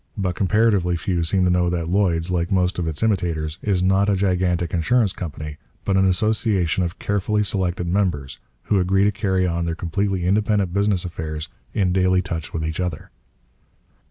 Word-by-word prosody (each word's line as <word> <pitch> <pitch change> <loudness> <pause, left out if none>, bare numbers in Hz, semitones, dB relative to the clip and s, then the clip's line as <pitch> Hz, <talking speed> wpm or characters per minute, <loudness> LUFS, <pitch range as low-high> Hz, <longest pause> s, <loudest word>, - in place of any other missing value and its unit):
But 95 -3 -1
comparatively 100 -2 +2
few 85 0 -1
seem 95 +3 +1
to 90 - +3
know 90 0 +2
that 85 -2 -2
Lloyd's, 90 -2 +1
like 85 -1 -1
most 90 -1 +1
of 85 - -1
its 80 +5 -2
imitators, 85 -7 -1
is 95 -3 0
not 95 +2 +3
a 100 - +3
gigantic 90 -3 0
insurance 95 +5 +2
company, 75 -3 -6 0.3
but 100 - +1
an 95 0 +4
association 95 -3 +1
of 85 0 -3
carefully 105 +1 0
selected 90 -3 -1
members, 85 -8 -1 0.2
who 100 - +1
agree 95 +2 +2
to 105 - +3
carry 95 -2 0
on 85 -1 -1
their 85 -1 -2
completely 95 +2 -1
independent 100 -1 +1
business 100 -2 +1
affairs 80 -3 -5 0.3
in 95 -3 +1
daily 95 0 +2
touch 85 -4 -5
with 80 -1 -3
each 80 +2 -3
other. 90 -8 -4
90 Hz, 180 wpm, -22 LUFS, 85-100 Hz, 0.3 s, an